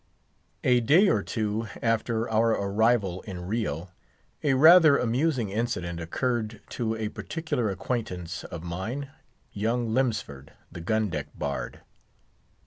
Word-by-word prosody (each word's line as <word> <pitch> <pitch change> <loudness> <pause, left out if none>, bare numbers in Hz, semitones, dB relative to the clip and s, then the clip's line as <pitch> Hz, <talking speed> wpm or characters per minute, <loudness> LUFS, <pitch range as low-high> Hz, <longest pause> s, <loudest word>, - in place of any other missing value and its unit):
A 125 -1 +4
day 160 - +5
or - - +2
two 110 0 -2
after 115 0 0
our 110 +1 +2
arrival 100 -2 +1
in 90 -3 -6
Rio, 95 -5 -2 0.5
a 140 -3 +2
rather 155 +1 +8
amusing 125 -2 0
incident 90 -6 -2
occurred 110 +5 -2
to 115 -2 -2
a 110 -1 -3
particular 155 -5 -3
acquaintance 90 -4 -4
of 85 -1 -7
mine, 110 +12 -4 0.4
young 115 +2 -1
Lemsford, 110 - -2 0.2
the 85 - -8
gun 110 +4 0
deck 75 -2 -3
bard. 70 -1 -4
110 Hz, 125 wpm, -27 LUFS, 95-125 Hz, 0.5 s, rather